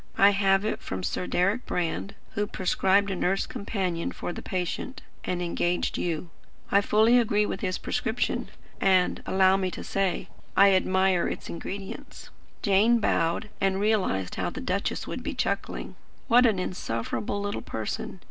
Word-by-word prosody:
I 200 Hz, +1 st, +7 dB
have 195 Hz, 0 st, +3 dB
it 215 Hz, -, -2 dB
from 95 Hz, -1 st, -5 dB
Sir 180 Hz, -, -2 dB
Deryck 195 Hz, +7 st, +1 dB
Brand, 180 Hz, +3 st, -2 dB, 0.2 s
who 205 Hz, 0 st, -1 dB
prescribed 195 Hz, +1 st, +2 dB
a -, -, -1 dB
nurse 190 Hz, +2 st, +1 dB
companion 185 Hz, -5 st, -3 dB
for 175 Hz, -, -5 dB
the -, -, -7 dB
patient, 185 Hz, +8 st, -4 dB, 0.2 s
and 180 Hz, -1 st, -2 dB
engaged 175 Hz, 0 st, 0 dB
you. 170 Hz, 0 st, -2 dB, 0.4 s
I 200 Hz, -, +5 dB
fully 220 Hz, +4 st, +5 dB
agreed 210 Hz, -3 st, +2 dB
with 195 Hz, -, -4 dB
his 185 Hz, -, -1 dB
prescription; 225 Hz, +2 st, -1 dB, 0.3 s
and, 185 Hz, -2 st, +3 dB
allow 190 Hz, 0 st, +4 dB
me 190 Hz, -1 st, 0 dB
to -, -, -7 dB
say, 195 Hz, -3 st, -1 dB, 0.3 s
I 200 Hz, +1 st, +8 dB
admire 190 Hz, -1 st, +3 dB
its -, -, -5 dB
ingredients." 195 Hz, +3 st, -7 dB, 0.3 s
Jane 210 Hz, +4 st, +4 dB
bowed, 185 Hz, +1 st, 0 dB
and 195 Hz, -1 st, +2 dB
realised 195 Hz, -, +1 dB
how -, -, 0 dB
the -, -, -7 dB
duchess -, -, -2 dB
would -, -, -5 dB
be -, -, -4 dB
chuckling. -, -, -2 dB, 0.3 s
What 245 Hz, +1 st, +6 dB
an 215 Hz, -4 st, +2 dB
insufferable 180 Hz, -, -3 dB
little 205 Hz, 0 st, -3 dB
person! 110 Hz, -1 st, -5 dB
195 Hz, 155 wpm, -27 LUFS, 180-205 Hz, 0.4 s, I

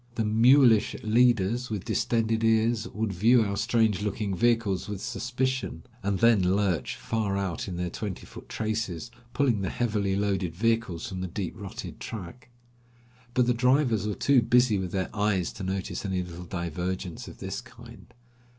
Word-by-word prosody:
The 110 Hz, -, 0 dB
mulish 115 Hz, +1 st, +5 dB
leaders, 120 Hz, +1 st, +2 dB
with 105 Hz, -4 st, -4 dB
distended 115 Hz, -1 st, 0 dB
ears, 115 Hz, 0 st, +2 dB
would 110 Hz, -3 st, -3 dB
view 115 Hz, +6 st, +4 dB
our 100 Hz, -1 st, -2 dB
strange 110 Hz, -2 st, +1 dB
looking 105 Hz, -1 st, -2 dB
vehicles 115 Hz, -4 st, +1 dB
with 105 Hz, -2 st, -4 dB
suspicion, 125 Hz, -6 st, -2 dB, 0.2 s
and 100 Hz, 0 st, 0 dB
then 115 Hz, -1 st, +5 dB
lurch 100 Hz, -5 st, 0 dB
far 105 Hz, -3 st, -2 dB
out 95 Hz, -3 st, -3 dB
in 90 Hz, -2 st, -5 dB
their 90 Hz, -1 st, -2 dB
twenty 100 Hz, -4 st, -5 dB
foot -, -, -12 dB
traces, 110 Hz, -2 st, -3 dB, 0.2 s
pulling 125 Hz, -8 st, +2 dB
the 95 Hz, -, -1 dB
heavily 105 Hz, -5 st, 0 dB
loaded 95 Hz, -4 st, -1 dB
vehicles 115 Hz, -4 st, 0 dB
from 95 Hz, -2 st, -5 dB
the 95 Hz, -, -2 dB
deep 90 Hz, 0 st, -4 dB
rutted -, -, -8 dB
track. 110 Hz, +4 st, -8 dB, 0.9 s
But 125 Hz, -, +4 dB
the 125 Hz, -, +2 dB
drivers 125 Hz, -3 st, +2 dB
were 105 Hz, -, -2 dB
too 140 Hz, -3 st, +4 dB
busy 120 Hz, -2 st, +3 dB
with 90 Hz, -2 st, -4 dB
their 95 Hz, +2 st, -3 dB
eyes 100 Hz, -4 st, 0 dB
to -, -, -8 dB
notice 95 Hz, 0 st, -3 dB
any 95 Hz, -3 st, -1 dB
little 90 Hz, 0 st, -9 dB
divergence 90 Hz, 0 st, -4 dB
of -, -, -10 dB
this -, -, -5 dB
kind. -, -, -14 dB
105 Hz, 165 wpm, -27 LUFS, 95-115 Hz, 0.9 s, mulish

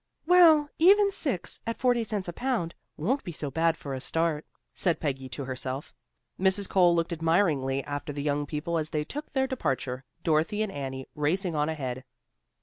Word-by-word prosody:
"Well, 325 Hz, -4 st, +7 dB
even 400 Hz, +4 st, +6 dB
six, 275 Hz, -, -2 dB
at 230 Hz, -, -2 dB
forty 245 Hz, -2 st, +2 dB
cents 210 Hz, -4 st, -2 dB
a 175 Hz, -, -4 dB
pound, 230 Hz, -8 st, -1 dB, 0.2 s
won't 255 Hz, -, 0 dB
be 175 Hz, -, -5 dB
so 150 Hz, -3 st, -4 dB
bad 165 Hz, +3 st, +2 dB
for 140 Hz, -4 st, -6 dB
a 130 Hz, -, -3 dB
start," 160 Hz, 0 st, 0 dB, 0.3 s
said 175 Hz, -4 st, +1 dB
Peggy 135 Hz, -3 st, -3 dB
to 135 Hz, +3 st, -5 dB
herself. 130 Hz, +2 st, -4 dB, 0.5 s
Mrs. 190 Hz, +1 st, +2 dB
Cole 175 Hz, -3 st, +4 dB
looked 170 Hz, +1 st, 0 dB
admiringly 160 Hz, -5 st, +1 dB
after 145 Hz, 0 st, -4 dB
the 145 Hz, 0 st, -4 dB
young 145 Hz, 0 st, 0 dB
people 165 Hz, +3 st, -2 dB
as 155 Hz, 0 st, -3 dB
they 150 Hz, -1 st, -1 dB
took 295 Hz, -, -7 dB
their 265 Hz, -1 st, +2 dB
departure, 135 Hz, -, -2 dB, 0.2 s
Dorothy 165 Hz, +7 st, +1 dB
and 215 Hz, -, -3 dB
Annie 135 Hz, -4 st, -5 dB
racing 170 Hz, +5 st, 0 dB
on 150 Hz, 0 st, 0 dB
ahead. 130 Hz, -5 st, -4 dB
165 Hz, 180 wpm, -28 LUFS, 145-210 Hz, 0.5 s, Well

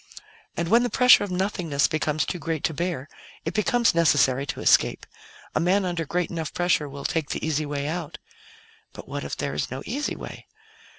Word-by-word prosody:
And 170 Hz, -, -1 dB
when 230 Hz, +6 st, +5 dB
the 245 Hz, -, 0 dB
pressure 250 Hz, -1 st, +6 dB
of 205 Hz, -, -4 dB
nothingness 180 Hz, -6 st, 0 dB
becomes 155 Hz, -1 st, 0 dB
too 180 Hz, -, -4 dB
great 160 Hz, -1 st, -3 dB
to 160 Hz, -, 0 dB
bear, 170 Hz, -3 st, -3 dB, 0.4 s
it -, -, -2 dB
becomes 240 Hz, +1 st, +2 dB
necessary 140 Hz, -5 st, +3 dB
to 150 Hz, -2 st, -4 dB
escape; -, -, +3 dB, 0.5 s
a -, -, +1 dB
man 185 Hz, +4 st, +2 dB
under 175 Hz, -2 st, -2 dB
great 180 Hz, +2 st, -1 dB
enough 165 Hz, -3 st, -4 dB
pressure 175 Hz, -4 st, +1 dB
will 140 Hz, 0 st, -8 dB
take 160 Hz, -3 st, -1 dB
the -, -, -3 dB
easy 155 Hz, -1 st, -1 dB
way 145 Hz, 0 st, -3 dB
out. 160 Hz, -1 st, -4 dB, 0.8 s
But -, -, -10 dB, 0.2 s
if -, -, -5 dB
there -, -, -2 dB
is 75 Hz, -, -2 dB
no 130 Hz, +2 st, -6 dB
easy 285 Hz, +6 st, -2 dB
way? -, -, -9 dB
165 Hz, 190 wpm, -25 LUFS, 145-180 Hz, 0.8 s, pressure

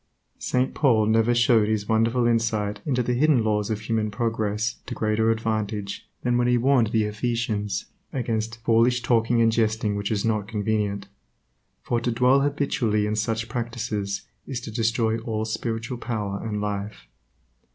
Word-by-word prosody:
St. 125 Hz, +1 st, 0 dB
Paul 115 Hz, -7 st, +3 dB
never 115 Hz, +2 st, +3 dB
showed 120 Hz, -3 st, +4 dB
his 105 Hz, -1 st, -1 dB
wonderful 115 Hz, +2 st, +2 dB
insight 110 Hz, -3 st, 0 dB
into 125 Hz, -3 st, +1 dB
the 125 Hz, -, 0 dB
hidden 135 Hz, -1 st, +3 dB
laws 105 Hz, -1 st, 0 dB
of 110 Hz, -1 st, -2 dB
human 110 Hz, -1 st, -1 dB
progress 110 Hz, 0 st, -1 dB
to -, -, -4 dB
greater 110 Hz, +1 st, +1 dB
advantage 110 Hz, -2 st, -2 dB
than 120 Hz, -1 st, +2 dB
when 120 Hz, -, +2 dB
he 125 Hz, 0 st, +3 dB
warned 125 Hz, -1 st, +3 dB
the 110 Hz, 0 st, +1 dB
Ephesians 105 Hz, -2 st, -2 dB, 0.3 s
against 115 Hz, -3 st, -2 dB
"Foolish 120 Hz, +2 st, +3 dB
talking 115 Hz, -1 st, +3 dB
and 115 Hz, -, +4 dB
jesting 110 Hz, -2 st, +1 dB
which 100 Hz, 0 st, -2 dB
is 105 Hz, -1 st, 0 dB
not 110 Hz, -3 st, 0 dB
convenient," 105 Hz, -2 st, -1 dB, 0.8 s
for 120 Hz, -1 st, 0 dB
to 120 Hz, -, -1 dB
dwell 125 Hz, +4 st, +4 dB
habitually 140 Hz, -7 st, 0 dB
in 105 Hz, 0 st, -1 dB
such 110 Hz, +1 st, -1 dB
practices 115 Hz, -4 st, -3 dB, 0.2 s
is 130 Hz, -3 st, -3 dB
to 115 Hz, -, -7 dB
destroy 115 Hz, 0 st, +1 dB
all 110 Hz, -1 st, -3 dB
spiritual 115 Hz, +2 st, -3 dB
power 105 Hz, -5 st, -3 dB
and 105 Hz, -2 st, -3 dB
life. 105 Hz, 0 st, -4 dB
110 Hz, 160 wpm, -25 LUFS, 105-120 Hz, 0.8 s, showed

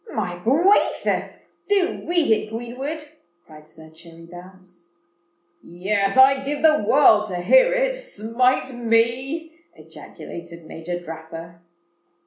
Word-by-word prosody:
"My 180 Hz, -5 st, -3 dB
gwathioth!—do 360 Hz, -, 0 dB
read 345 Hz, -7 st, +1 dB
it, 215 Hz, 0 st, +1 dB
Greenwood," 255 Hz, +7 st, -6 dB, 0.4 s
cried 155 Hz, -1 st, -16 dB
Sir 160 Hz, 0 st, -15 dB
Cherry 165 Hz, +1 st, -15 dB
Bounce. 180 Hz, 0 st, -15 dB, 0.7 s
"Yes: 195 Hz, +4 st, -2 dB
I'd 270 Hz, +1 st, +5 dB
give 290 Hz, +2 st, -4 dB
the 310 Hz, -6 st, +4 dB
world 220 Hz, -7 st, +5 dB
to 185 Hz, -, -5 dB
hear -, -, +4 dB
it—smite 270 Hz, -, -1 dB
me!" 245 Hz, +7 st, -1 dB, 0.2 s
ejaculated 170 Hz, -1 st, -12 dB
Major 170 Hz, +2 st, -6 dB
Dapper. 165 Hz, 0 st, -10 dB
220 Hz, 105 wpm, -22 LUFS, 175-290 Hz, 0.7 s, I'd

